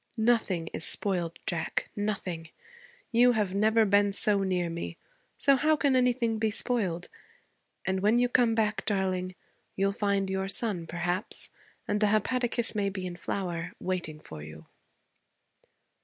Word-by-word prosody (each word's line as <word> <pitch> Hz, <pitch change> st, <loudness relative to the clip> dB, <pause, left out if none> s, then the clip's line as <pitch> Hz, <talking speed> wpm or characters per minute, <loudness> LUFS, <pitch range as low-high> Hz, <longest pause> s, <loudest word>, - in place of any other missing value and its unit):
'Nothing 220 Hz, -7 st, +2 dB
is -, -, -1 dB
spoiled, 175 Hz, -4 st, +1 dB
Jack, 165 Hz, -2 st, -2 dB
nothing. 190 Hz, -6 st, -3 dB, 0.6 s
You 245 Hz, +1 st, +5 dB
have 210 Hz, -5 st, 0 dB
never 220 Hz, +2 st, +3 dB
been 205 Hz, 0 st, +3 dB
so 205 Hz, 0 st, +2 dB
near 180 Hz, -2 st, 0 dB
me 170 Hz, 0 st, -5 dB, 0.4 s
so 275 Hz, -1 st, +5 dB
how 310 Hz, +4 st, +3 dB
can 280 Hz, -3 st, +2 dB
anything 245 Hz, -3 st, +2 dB
be 220 Hz, 0 st, +2 dB
spoiled? 205 Hz, -6 st, -2 dB, 0.8 s
And 190 Hz, 0 st, 0 dB
when 210 Hz, +4 st, +3 dB
you 245 Hz, 0 st, +3 dB
come 240 Hz, -2 st, +3 dB
back, 215 Hz, -1 st, 0 dB
darling, 185 Hz, -2 st, -1 dB, 0.4 s
you'll 195 Hz, +1 st, +1 dB
find 200 Hz, -1 st, 0 dB
your 190 Hz, 0 st, -2 dB
son, 195 Hz, -6 st, +3 dB
perhaps, 175 Hz, +4 st, -3 dB, 0.4 s
and 210 Hz, +1 st, 0 dB
the 210 Hz, -, +5 dB
hepaticas 235 Hz, +3 st, +1 dB
may 205 Hz, -2 st, 0 dB
be 190 Hz, -1 st, -5 dB
in 180 Hz, -1 st, -5 dB
flower, 175 Hz, -1 st, -4 dB
waiting 175 Hz, -4 st, -3 dB
for 80 Hz, -, -10 dB
you.' 75 Hz, +1 st, -11 dB
200 Hz, 145 wpm, -29 LUFS, 180-225 Hz, 0.8 s, You